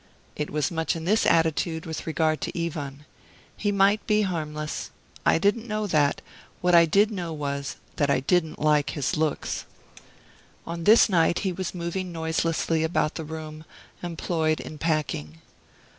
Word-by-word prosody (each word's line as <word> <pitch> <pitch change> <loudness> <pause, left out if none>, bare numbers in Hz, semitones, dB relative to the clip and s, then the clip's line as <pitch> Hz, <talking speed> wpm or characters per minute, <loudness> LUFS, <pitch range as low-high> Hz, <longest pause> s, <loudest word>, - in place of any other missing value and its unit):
I 150 - +1
was 150 +1 -1
much 160 0 -1
in 165 0 -5
this 215 +5 +3
attitude 160 0 +2
with 160 0 -6
regard 155 -1 +1
to 170 - -2
Ivan. 145 -3 -6 0.5
He 205 - 0
might 200 +1 +3
be 210 0 +3
harmless. 155 -5 -3 0.4
I - - +5
didn't 205 +7 +1
know 215 -1 -1
that; 150 -7 +2 0.4
what 180 0 +2
I 170 -1 +8
did 205 +6 +4
know 175 -5 -4
was 140 -2 -3 0.2
that 145 -2 +2
I 140 - +3
didn't 160 +3 +1
like 150 -1 +2
his 145 +5 0
looks. 155 -2 -1 1.0
On 170 0 -5
this 220 +2 +7
night 175 -4 +3
he 185 - 0
was 185 0 -4
moving 175 +1 -3
noiselessly 160 0 0
about 160 -1 +1
the 160 - -5
room, 155 0 -7 0.4
employed 165 -2 -1
in 155 - -8
packing. 145 - -1
160 Hz, 160 wpm, -26 LUFS, 155-180 Hz, 1.0 s, I